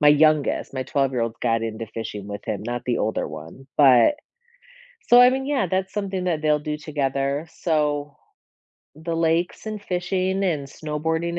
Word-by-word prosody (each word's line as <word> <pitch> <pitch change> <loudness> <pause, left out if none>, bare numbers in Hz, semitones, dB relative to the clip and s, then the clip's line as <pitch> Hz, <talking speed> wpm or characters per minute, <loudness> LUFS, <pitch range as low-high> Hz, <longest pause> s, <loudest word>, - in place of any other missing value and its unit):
my 150 - +4
youngest, 150 0 +3
my 130 -1 -2
twelve-year-old 125 -4 0
got 115 -1 +1
into 115 0 -4
fishing 105 -2 -6
with 100 0 -7
him, - - -3
not 120 +2 -4
the 120 - +1
older 110 - -1
one, 80 - -10
but 135 - +6 0.9
so 245 0 +8
I 250 - +8
mean, 265 +1 -2
yeah, 275 -9 0
that's 190 +1 -1
something 195 -3 -2
that 165 -4 0
they'll 150 -1 +3
do 150 0 -3
together, 140 0 -2
so 150 -3 -1 0.8
the 165 +2 -4
lakes 165 +2 0
and 215 -1 -4
fishing 190 +1 -1
and 150 -6 -1
snowboarding 160 +4 -2
150 Hz, 165 wpm, -23 LUFS, 130-180 Hz, 0.9 s, so